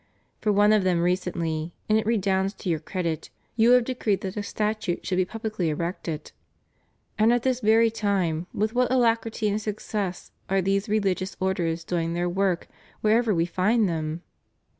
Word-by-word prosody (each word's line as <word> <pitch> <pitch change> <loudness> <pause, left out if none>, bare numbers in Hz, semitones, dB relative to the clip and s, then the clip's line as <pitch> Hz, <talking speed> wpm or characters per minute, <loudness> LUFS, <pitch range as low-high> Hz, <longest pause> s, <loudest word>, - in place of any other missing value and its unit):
For 215 - +1
one 205 +1 +5
of 210 -2 +3
them 180 -2 +2
recently, 170 -2 -1
and 215 - +3
it 220 0 +1
redounds 195 -3 +1
to 185 - -5
your 160 -2 +1
credit, 165 -1 -3 0.3
you 230 +1 +4
have 250 -1 +6
decreed 230 -5 -1
that 190 -1 -5
a 210 - -2
statue 210 -3 -2
should 180 - -1
be 185 -1 +2
pubHcly 215 -5 -3
erected. 165 0 -3 0.9
And 220 +2 +5
at 240 -1 +2
this 255 -1 +1
very 225 0 +4
time, 185 -6 0
with 215 +2 -1
what 250 0 +2
alacrity 230 -3 +1
and 210 +1 0
success 205 -3 -4 0.2
are 195 0 +2
these 195 +3 0
rehg 205 -3 +1
ious 190 +1 -5
orders 175 -3 -1
doing 165 0 -2
their 175 +1 0
work 185 0 0 0.4
wherever 220 +1 +3
we 165 -4 +2
find 205 +5 +2
them! 160 0 -3
195 Hz, 175 wpm, -25 LUFS, 175-220 Hz, 0.9 s, have